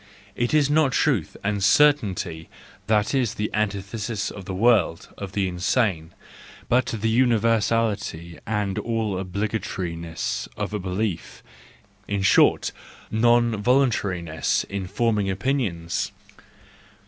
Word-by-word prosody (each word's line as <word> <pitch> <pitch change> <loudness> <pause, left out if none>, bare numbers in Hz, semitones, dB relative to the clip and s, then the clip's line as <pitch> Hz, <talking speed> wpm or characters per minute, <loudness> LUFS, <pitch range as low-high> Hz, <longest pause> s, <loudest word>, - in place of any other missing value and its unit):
It 120 0 0
is 150 -2 +4
not 145 -3 +2
truth - - +1
and 100 -1 -1
certainty 100 - +2 0.4
that 105 +1 +2
is 125 -5 +1
the 105 0 -2
antithesis 105 +1 -2
of 100 -3 -9
the 95 - -5
world 100 -6 +2
of 95 -2 -7
the 100 -1 0
insane, 90 -2 0 0.5
but 125 +2 +2
the 115 0 -2
universality 110 -7 +1
and 105 -3 -1
all 110 -5 -2
obligatoriness 90 - -3
of - - -3
a 105 - -1
belief, 90 - -3 0.6
in 100 -1 -1
short, - - +4 0.4
non 120 -1 +3
voluntariness 100 - +1
in 100 -2 -5
forming 105 -1 0
opinions. 95 -6 -1
105 Hz, 110 wpm, -24 LUFS, 95-115 Hz, 0.6 s, is